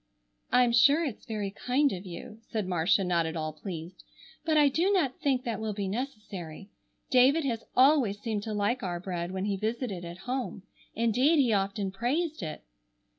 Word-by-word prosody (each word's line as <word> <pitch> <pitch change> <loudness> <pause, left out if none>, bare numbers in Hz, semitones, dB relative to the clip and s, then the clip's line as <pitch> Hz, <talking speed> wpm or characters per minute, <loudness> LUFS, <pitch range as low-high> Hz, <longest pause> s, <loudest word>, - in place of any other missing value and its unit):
"I'm 250 -1 +5
sure 285 +7 +5
it's 260 -8 -6
very 210 -3 -3
kind 260 +7 +1
of 185 +1 -7
you," 215 +6 -9
said 220 -2 -3
Marcia, 180 +2 +2
not 170 -2 +1
at 160 - -5
all 155 -1 -3
pleased, 165 +2 -8 0.4
"but 315 -3 +2
I 295 -1 +6
do 335 +8 +2
not 315 -10 +1
think 265 -3 +1
that 230 -2 -3
will 220 -2 -3
be 200 -2 -2
necessary. 200 - -6 0.4
David 270 +5 +5
has 230 -4 -2
always 255 -6 +4
seemed 215 -2 -2
to 215 +1 -4
like 210 +5 0
our 175 -4 -3
bread 175 -1 -4
when 190 +1 -2
he 200 -1 -1
visited 215 -3 -3
at 170 0 -7
home. 250 -6 -3 0.3
Indeed 245 +8 +3
he 250 -6 +3
often 195 0 0
praised 290 - -1
it." 155 -3 -6
220 Hz, 180 wpm, -29 LUFS, 190-260 Hz, 0.4 s, I